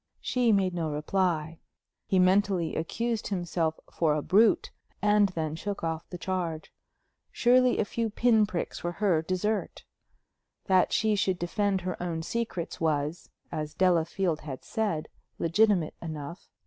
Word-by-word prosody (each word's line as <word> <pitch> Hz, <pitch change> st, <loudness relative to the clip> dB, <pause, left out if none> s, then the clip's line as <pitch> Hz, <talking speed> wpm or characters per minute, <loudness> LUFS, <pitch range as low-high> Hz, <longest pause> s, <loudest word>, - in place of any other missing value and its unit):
She 245 Hz, -2 st, +1 dB
made 190 Hz, -3 st, +2 dB
no 165 Hz, -3 st, -2 dB
reply. 160 Hz, +1 st, -1 dB, 0.5 s
He 190 Hz, -, +2 dB
mentally 185 Hz, -2 st, +3 dB
accused 230 Hz, +7 st, -2 dB
himself 175 Hz, -4 st, -1 dB
for 155 Hz, -3 st, +2 dB
a 150 Hz, -, -2 dB
brute, 210 Hz, +3 st, +3 dB, 0.3 s
and 210 Hz, -1 st, +4 dB
then 160 Hz, -4 st, -3 dB
shook 200 Hz, +3 st, -5 dB
off 165 Hz, 0 st, -3 dB
the 180 Hz, -, -6 dB
charge. 175 Hz, -3 st, -3 dB, 0.6 s
Surely 250 Hz, +1 st, +4 dB
a -, -, +1 dB
few 230 Hz, +2 st, -2 dB
pin 220 Hz, -1 st, +3 dB
pricks 180 Hz, -4 st, -4 dB
were 175 Hz, 0 st, -2 dB
her 180 Hz, -4 st, +2 dB
desert! 185 Hz, +5 st, -2 dB, 0.8 s
That 185 Hz, -2 st, +3 dB
she 215 Hz, -1 st, +2 dB
should 190 Hz, -2 st, +1 dB
defend 195 Hz, +2 st, 0 dB
her 185 Hz, 0 st, -4 dB
own 165 Hz, -2 st, -3 dB
secrets 200 Hz, -5 st, -4 dB
was, 155 Hz, +1 st, -1 dB, 0.2 s
as 150 Hz, -1 st, -4 dB
Delafield 175 Hz, -1 st, +1 dB
had 140 Hz, -4 st, -7 dB
said, 205 Hz, -9 st, -2 dB, 0.3 s
legitimate 180 Hz, -1 st, +2 dB
enough. 155 Hz, +1 st, -7 dB
180 Hz, 140 wpm, -28 LUFS, 160-205 Hz, 0.8 s, and